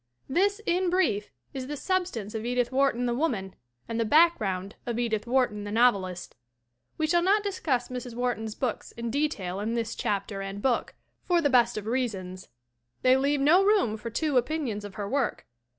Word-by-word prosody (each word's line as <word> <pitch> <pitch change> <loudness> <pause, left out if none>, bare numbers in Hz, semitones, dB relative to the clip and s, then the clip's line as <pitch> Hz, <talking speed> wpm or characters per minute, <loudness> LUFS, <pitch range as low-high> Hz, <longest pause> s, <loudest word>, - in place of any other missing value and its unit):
This, 400 +8 +2
in 360 +1 +1
brief, 305 - +1 0.2
is 260 -2 -5
the 295 +1 -4
substance 350 - -2
of 220 -1 -4
Edith 245 +1 0
Wharton 260 -2 +2
the 240 - 0
woman 235 - -1 0.3
and 230 0 -3
the - - +3
background 215 - +3
of 235 -1 -2
Edith 230 -2 -1
Wharton 245 -5 +1
the 205 - -5
novelist. 200 -6 +1 0.6
We 315 - +1
shall 345 +2 +3
not 405 +4 +3
discuss 315 -11 -1
Mrs. 250 -2 -6
Wharton's 235 -3 -2
books 250 -5 -3
in 235 0 -4
de 290 +4 +2
tail 185 -6 -5
in 220 +3 -2
this 230 -2 -2
chapter 200 0 -2
and 195 +1 -5
book 250 +3 0 0.3
for 350 -1 +4
the 290 -4 +1
best 240 -2 +4
of 210 - -4
reasons 200 -7 -3 0.5
they 255 0 +6
leave 280 +1 +1
no 340 +7 +5
room 390 - +3
for 220 +2 -6
two 290 +3 0
opinions 250 -5 -1
of 205 -2 -9
her 205 -1 -4
work. 270 +3 -1
245 Hz, 185 wpm, -27 LUFS, 210-295 Hz, 0.6 s, they